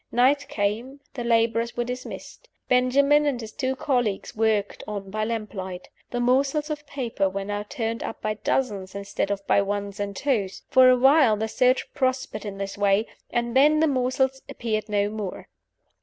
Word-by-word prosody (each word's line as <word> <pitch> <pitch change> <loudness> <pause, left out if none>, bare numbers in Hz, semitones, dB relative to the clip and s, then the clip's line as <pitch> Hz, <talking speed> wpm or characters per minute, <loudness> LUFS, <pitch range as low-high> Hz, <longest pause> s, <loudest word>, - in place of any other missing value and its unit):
Night 270 +4 +3
came; 225 +7 -2
the 245 - -4
laborers 230 0 +1
were 240 - +1
dismissed; 250 - -8 0.2
Benjamin 280 +4 +4
and 270 -4 0
his 220 -2 -7
two 260 0 -2
colleagues 245 -8 -1
worked 215 -2 0
on 200 -2 -5
by 215 +1 -1
lamplight. 205 -5 -5 0.2
The 245 - -3
morsels 275 +5 +1
of 295 -1 -5
paper 235 -9 -1
were 195 +1 -4
now 205 0 -3
turned 225 -1 -3
up 225 - -5
by 215 - -1
dozens, 205 -4 -2
instead 200 0 -3
of 200 -1 -3
by 200 - +4
ones 200 0 -3
and 200 -1 -3
twos. 210 -7 -1
For 260 0 +7
a 255 - +5
while 265 -3 +5
the 220 +1 -1
search 255 +3 +1
prospered 260 -5 -1
in 200 -1 -5
this 195 0 -5
way; 200 +1 +3 0.2
and 235 0 -1
then 300 +3 +5
the 320 - +4
morsels 265 -1 0
appeared 215 -2 -3
no 205 -1 +1
more. 210 -4 -6
230 Hz, 175 wpm, -25 LUFS, 205-260 Hz, 0.2 s, For